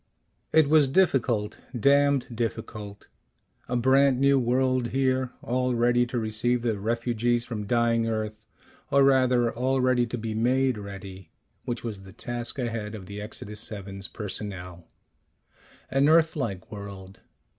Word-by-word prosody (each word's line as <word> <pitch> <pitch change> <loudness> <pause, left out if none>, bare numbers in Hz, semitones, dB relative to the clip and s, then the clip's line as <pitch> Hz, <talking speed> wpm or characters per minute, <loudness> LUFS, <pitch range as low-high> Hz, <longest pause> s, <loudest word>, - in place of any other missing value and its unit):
It 160 -2 +5
was 150 -1 +5
difficult. 130 - +1 0.2
Damned 140 -1 +3
difficult. 110 -3 -5 0.6
A 125 - -1
brand 130 +1 +4
new 140 0 +4
world 130 0 +1
here, 130 0 0
all 125 +1 0
ready 120 +1 +3
to 120 - -3
receive 115 +2 0
the 110 -4 -1
refugees 120 +2 0
from 105 -4 -5
dying 115 0 +2
Earth. 110 -1 -4 0.4
Or 140 0 +4
rather, 130 -3 +3
all 130 +2 0
ready 125 -1 +2
to 120 - -4
be 110 -1 -4
made 125 +1 +1
ready, 95 -1 -9 0.4
which 120 -1 -3
was 110 -4 -5
the 95 -1 -13
task 120 +4 -5
ahead 115 -4 -3
of 100 -3 -9
the 100 +2 -7
Exodus 105 0 -5
VII's 100 -2 -6
personnel. 90 -3 -4 1.0
An 135 +2 +3
Earth 160 0 +4
like 105 - -4
world. 100 -2 -9
120 Hz, 140 wpm, -26 LUFS, 105-130 Hz, 1.0 s, It